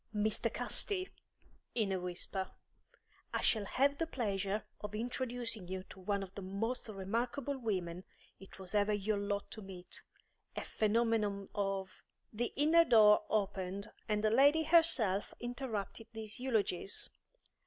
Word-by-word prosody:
Mr. 210 Hz, 0 st, +1 dB
Casti," 375 Hz, -2 st, +1 dB, 0.7 s
in 215 Hz, -5 st, +1 dB
a 190 Hz, -, 0 dB
whisper, 180 Hz, +2 st, -3 dB, 0.8 s
"I -, -, -1 dB
shall 215 Hz, -3 st, +3 dB
have 280 Hz, +7 st, +2 dB
the 330 Hz, -, 0 dB
pleasure 205 Hz, -6 st, -1 dB
of 210 Hz, 0 st, -5 dB
introducing 235 Hz, -3 st, -2 dB
you 185 Hz, 0 st, -4 dB
to -, -, -11 dB
one 200 Hz, +1 st, -1 dB
of 190 Hz, -1 st, -9 dB
the 200 Hz, -, -6 dB
most 200 Hz, +7 st, -2 dB
remarkable 235 Hz, +8 st, -2 dB
women 185 Hz, -6 st, -2 dB, 0.4 s
it 195 Hz, -, -13 dB
was 190 Hz, -2 st, -5 dB
ever 205 Hz, 0 st, +3 dB
your 205 Hz, 0 st, 0 dB
lot 200 Hz, 0 st, -2 dB
to 220 Hz, -, -6 dB
meet; 190 Hz, -2 st, -8 dB, 0.5 s
a -, -, -2 dB
phenomenon 215 Hz, -2 st, +1 dB
of 195 Hz, -1 st, -2 dB, 0.2 s
" -, -, -42 dB
The 235 Hz, +3 st, -1 dB
inner 315 Hz, +4 st, +6 dB
door 215 Hz, -7 st, +6 dB
opened, 200 Hz, -1 st, -1 dB, 0.2 s
and 210 Hz, 0 st, +1 dB
the 215 Hz, -, +4 dB
lady 285 Hz, +7 st, +6 dB
herself 295 Hz, -, +3 dB
interrupted 240 Hz, -3 st, -4 dB
these 220 Hz, 0 st, -6 dB
eulogies. 215 Hz, -7 st, 0 dB
210 Hz, 145 wpm, -35 LUFS, 195-240 Hz, 0.8 s, inner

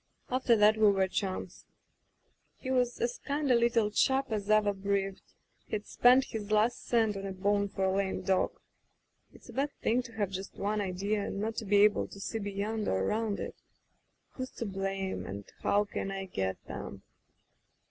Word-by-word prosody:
After 255 Hz, -2 st, +3 dB
that 215 Hz, 0 st, +5 dB
we 215 Hz, -1 st, +6 dB
were 195 Hz, -1 st, +2 dB
chums.... 190 Hz, 0 st, -3 dB, 0.9 s
"He 260 Hz, -, -5 dB
was 250 Hz, -2 st, +1 dB
as 240 Hz, +1 st, -1 dB
kind 285 Hz, -1 st, -1 dB
a -, -, +6 dB
little 235 Hz, -2 st, +3 dB
chap 265 Hz, +3 st, +2 dB
as 210 Hz, -1 st, -2 dB
ever 215 Hz, -1 st, +4 dB
breathed; 195 Hz, 0 st, -1 dB, 0.5 s
he'd 210 Hz, -1 st, -3 dB
spend 250 Hz, +2 st, +5 dB
his 215 Hz, -4 st, -6 dB
last 215 Hz, +3 st, +2 dB
cent 225 Hz, -3 st, +2 dB
on 195 Hz, -, -5 dB
a -, -, -4 dB
bone 200 Hz, +1 st, +1 dB
for 195 Hz, -1 st, -3 dB
a 190 Hz, 0 st, +2 dB
lame 195 Hz, -1 st, -1 dB
dog.... 190 Hz, -1 st, +1 dB, 0.7 s
"It's -, -, -17 dB
a -, -, -9 dB
bad 280 Hz, +2 st, 0 dB
thing 240 Hz, +3 st, +3 dB
to 235 Hz, -2 st, -12 dB
have 205 Hz, -4 st, -1 dB
just 190 Hz, +1 st, -6 dB
one 210 Hz, +1 st, 0 dB
idea, 200 Hz, +2 st, -1 dB
and 195 Hz, -, -4 dB
not 220 Hz, +2 st, -2 dB
be 200 Hz, 0 st, +5 dB
able 210 Hz, 0 st, +3 dB
to 200 Hz, -, -12 dB
see 225 Hz, +3 st, -3 dB
beyond 205 Hz, +2 st, -2 dB
or 95 Hz, -, +1 dB
around 215 Hz, -, 0 dB
it. -, -, -5 dB, 0.4 s
* -, -, -46 dB
Who's 255 Hz, -1 st, -5 dB
to 230 Hz, -, -4 dB
blame, 195 Hz, -1 st, -3 dB
and 100 Hz, +1 st, -6 dB, 0.2 s
how 205 Hz, +1 st, +3 dB
can 195 Hz, -, -4 dB
I 195 Hz, 0 st, -4 dB
get 95 Hz, -, -2 dB
at -, -, -5 dB
'cm -, -, -8 dB
205 Hz, 190 wpm, -31 LUFS, 195-225 Hz, 0.9 s, we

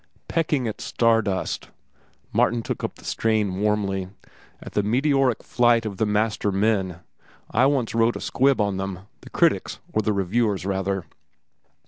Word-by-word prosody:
"Pecking 150 Hz, -6 st, 0 dB
at 110 Hz, -, -5 dB
star 115 Hz, -1 st, +2 dB
dust," 95 Hz, -4 st, -3 dB, 0.6 s
Martin 120 Hz, -1 st, +2 dB
took -, -, -4 dB
up -, -, -3 dB
the -, -, -16 dB
strain 105 Hz, -4 st, 0 dB
warmly; 100 Hz, -3 st, 0 dB, 0.5 s
"at -, -, -10 dB
the 105 Hz, -, +2 dB
meteoric 130 Hz, +3 st, +2 dB
flight 120 Hz, -2 st, +3 dB
of 100 Hz, -3 st, -4 dB
the 110 Hz, -, +1 dB
master 105 Hz, 0 st, 0 dB
men. 95 Hz, -3 st, 0 dB, 0.5 s
I 130 Hz, +4 st, +4 dB
once 135 Hz, -5 st, 0 dB
wrote 115 Hz, +1 st, +2 dB
a -, -, -4 dB
squib 135 Hz, 0 st, +2 dB
on 100 Hz, -2 st, +1 dB
them—the 95 Hz, 0 st, -7 dB
critics, -, -, +1 dB, 0.2 s
or 110 Hz, -, +2 dB
the 110 Hz, -, 0 dB
reviewers, 100 Hz, -1 st, 0 dB
rather." 95 Hz, -1 st, -1 dB
105 Hz, 150 wpm, -24 LUFS, 95-120 Hz, 0.6 s, I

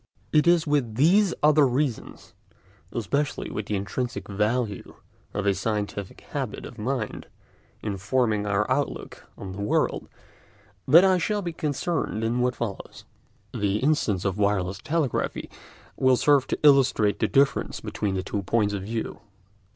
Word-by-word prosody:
It 155 Hz, +1 st, +4 dB
is 170 Hz, -2 st, +4 dB
with 140 Hz, -7 st, 0 dB
these 180 Hz, -, +4 dB
other 150 Hz, -1 st, +5 dB
reasons, 130 Hz, -1 st, -3 dB, 0.6 s
especially 140 Hz, +6 st, -2 dB
with 105 Hz, -1 st, -4 dB
the 105 Hz, -, -1 dB
intrinsic 120 Hz, +5 st, -3 dB
value 105 Hz, +1 st, -2 dB, 0.4 s
of 105 Hz, -, -3 dB
a 100 Hz, -, +3 dB
scientific 100 Hz, 0 st, -3 dB
habit -, -, -4 dB
of 120 Hz, -, -11 dB
mind 120 Hz, 0 st, -3 dB, 0.6 s
in 100 Hz, -2 st, -3 dB
forming 105 Hz, 0 st, 0 dB
our 100 Hz, +1 st, +1 dB
outlook -, -, -3 dB
on 95 Hz, -2 st, -7 dB
the 100 Hz, +2 st, -6 dB
world, 105 Hz, -, 0 dB, 0.8 s
that 165 Hz, +8 st, +8 dB
I 185 Hz, -1 st, +4 dB
shall 205 Hz, +3 st, -1 dB
be 170 Hz, -2 st, -4 dB
concerned 150 Hz, -6 st, -2 dB
in 115 Hz, +2 st, 0 dB
what 125 Hz, 0 st, +1 dB
follows. 110 Hz, -5 st, -6 dB, 0.5 s
The 100 Hz, 0 st, 0 dB
instance 110 Hz, -, +1 dB
of 100 Hz, +1 st, -1 dB
wireless 100 Hz, -2 st, 0 dB
telegraphy 155 Hz, -5 st, -2 dB, 0.4 s
will 130 Hz, -1 st, +3 dB
serve 140 Hz, -1 st, +3 dB
to -, -, -2 dB
illustrate 130 Hz, -8 st, +4 dB
the -, -, +2 dB
difference 140 Hz, 0 st, +1 dB
between 100 Hz, -2 st, -3 dB
the 95 Hz, -, -2 dB
two 100 Hz, +2 st, -3 dB
points 105 Hz, +1 st, +1 dB
of 100 Hz, -, -3 dB
view. 110 Hz, +3 st, -4 dB
115 Hz, 150 wpm, -25 LUFS, 105-145 Hz, 0.8 s, that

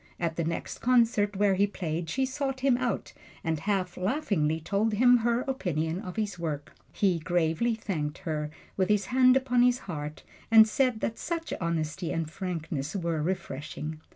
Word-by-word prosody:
At 165 Hz, -2 st, -1 dB
the 170 Hz, -, -1 dB
next 165 Hz, +1 st, -4 dB
concert 230 Hz, -4 st, +3 dB
where 200 Hz, 0 st, +3 dB
he 200 Hz, +2 st, +3 dB
played 165 Hz, -4 st, -4 dB
she 265 Hz, 0 st, +1 dB
sought 270 Hz, 0 st, -3 dB
him 265 Hz, -2 st, +4 dB
out 245 Hz, -1 st, -2 dB, 0.3 s
and 160 Hz, -1 st, -1 dB
half 190 Hz, -1 st, -1 dB
laughingly 185 Hz, -, 0 dB
told 205 Hz, +6 st, 0 dB
him 245 Hz, +3 st, +6 dB
her 235 Hz, +1 st, +1 dB
opinion 175 Hz, -, -2 dB
of 180 Hz, -, -7 dB
his 205 Hz, -5 st, -2 dB
work. 150 Hz, -4 st, -4 dB, 0.2 s
He 185 Hz, -4 st, +1 dB
gravely 175 Hz, +7 st, +1 dB
thanked 155 Hz, -9 st, -3 dB
her, 150 Hz, -2 st, -2 dB, 0.3 s
with 190 Hz, 0 st, +1 dB
his 210 Hz, -2 st, +3 dB
hand 255 Hz, 0 st, +6 dB
upon 250 Hz, -2 st, +2 dB
his 245 Hz, 0 st, +4 dB
heart, 150 Hz, -4 st, -6 dB, 0.3 s
and 220 Hz, -1 st, +8 dB
said 250 Hz, 0 st, +1 dB
that 230 Hz, -, -2 dB
such 330 Hz, -1 st, -3 dB
honesty 170 Hz, +1 st, -2 dB
and 165 Hz, -1 st, -1 dB
frankness 160 Hz, -3 st, -4 dB
were 170 Hz, -4 st, -1 dB
refreshing. 155 Hz, -2 st, -4 dB
190 Hz, 170 wpm, -28 LUFS, 160-235 Hz, 0.3 s, and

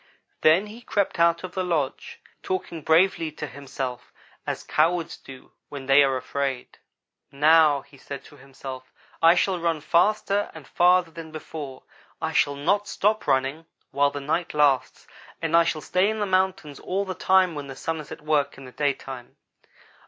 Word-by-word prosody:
Then 165 Hz, +6 st, +5 dB
he 215 Hz, +3 st, -11 dB
crept 200 Hz, -6 st, -1 dB
out 170 Hz, +1 st, +3 dB
of 185 Hz, -1 st, -7 dB
the 185 Hz, -, -1 dB
lodge, 160 Hz, -7 st, -2 dB, 0.2 s
talking 180 Hz, -3 st, -4 dB
bravely 165 Hz, +1 st, +3 dB
to 150 Hz, -, -5 dB
himself 130 Hz, -2 st, -6 dB, 0.4 s
as -, -, -3 dB
cowards 165 Hz, +2 st, +1 dB
do 130 Hz, -1 st, -14 dB, 0.2 s
when 140 Hz, -2 st, -7 dB
they 135 Hz, +2 st, +6 dB
are 135 Hz, -2 st, +2 dB
afraid. 135 Hz, 0 st, -4 dB, 0.5 s
"'Now,' 150 Hz, 0 st, +5 dB
he 140 Hz, -, -19 dB
said 140 Hz, 0 st, -8 dB
to 145 Hz, -, -16 dB
himself, 135 Hz, -1 st, -10 dB, 0.3 s
'I 165 Hz, +1 st, +7 dB
shall 185 Hz, 0 st, +1 dB
run 165 Hz, -2 st, 0 dB
faster 200 Hz, +5 st, +1 dB
and 155 Hz, -3 st, -11 dB
farther 180 Hz, -1 st, +3 dB
than 160 Hz, -1 st, -9 dB
before. 150 Hz, -4 st, -8 dB, 0.4 s
I 160 Hz, 0 st, -2 dB
shall 145 Hz, -2 st, +2 dB
not 195 Hz, +9 st, 0 dB
stop 215 Hz, +2 st, 0 dB
running 135 Hz, +4 st, 0 dB, 0.2 s
while 140 Hz, +1 st, +3 dB
the 145 Hz, 0 st, -6 dB
night 155 Hz, +4 st, -2 dB
lasts, 145 Hz, -3 st, +2 dB, 0.3 s
and 165 Hz, 0 st, 0 dB
I 170 Hz, 0 st, +6 dB
shall 155 Hz, -2 st, -1 dB
stay 185 Hz, +5 st, +1 dB
in 220 Hz, -, -2 dB
the 210 Hz, -, 0 dB
mountains 185 Hz, -6 st, 0 dB
all 195 Hz, +2 st, -2 dB
the 190 Hz, -, -4 dB
time 185 Hz, 0 st, +3 dB
when 145 Hz, -2 st, -6 dB
the 135 Hz, -, -8 dB
Sun 160 Hz, +4 st, -3 dB
is 150 Hz, -, -10 dB
at 160 Hz, -1 st, -9 dB
work 150 Hz, -2 st, 0 dB
in 135 Hz, -, -11 dB
the 125 Hz, -, -11 dB
daytime!' 135 Hz, -3 st, -3 dB
155 Hz, 175 wpm, -25 LUFS, 140-180 Hz, 0.5 s, I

